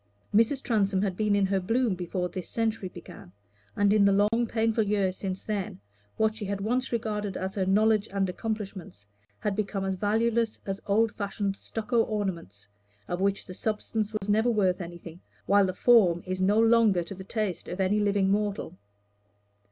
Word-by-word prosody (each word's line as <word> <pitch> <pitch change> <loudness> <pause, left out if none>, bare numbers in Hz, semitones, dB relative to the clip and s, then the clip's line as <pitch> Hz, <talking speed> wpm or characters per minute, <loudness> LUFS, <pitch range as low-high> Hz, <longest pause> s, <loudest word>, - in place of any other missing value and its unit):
Mrs. 230 +6 +3
Transome 200 -5 +1
had 190 -3 -1
been 210 0 +1
in 200 -1 +3
her 195 0 +1
bloom 225 +4 +1
before 180 0 -3
this 180 0 -7
century 225 -4 -1
began, 90 - -12 0.4
and 205 0 +3
in 210 -1 +4
the 200 - +5 0.2
long 235 +1 +1
painful 225 0 +1
years 200 -2 0
since 190 -1 -4
then, 200 - -3 0.4
what 220 0 +2
she 220 -2 -5
had 200 0 -3
once 245 +6 -1
regarded 210 -4 -2
as 190 +1 -3
her 190 -3 -1
knowledge 215 +2 +3
and 195 -1 0
accomplishments 190 - -5 0.3
had 205 - -2
become 200 -2 -2
as 190 - 0
valueless 220 +3 0
as 195 0 -4
old 215 +2 +3
fashioned 200 -1 -3
stucco 225 +3 -1
ornaments, 175 - -4 0.4
of 175 +1 -3
which 200 0 0
the 185 - -9
substance 215 +1 -2
was 210 -2 -4
never 220 +3 +3
worth 195 -5 +1
anything, 170 0 -9 0.2
while 200 -1 +4
the - - -1
form 185 -7 +4
is 185 0 -3
no 205 +3 +3
longer 225 -5 +4
to 170 - -8
the 190 0 -9
taste 210 -2 -3
of 180 - -5
any 195 +2 +2
living 200 -2 +2
mortal. 205 -4 -1
205 Hz, 180 wpm, -27 LUFS, 190-220 Hz, 0.4 s, the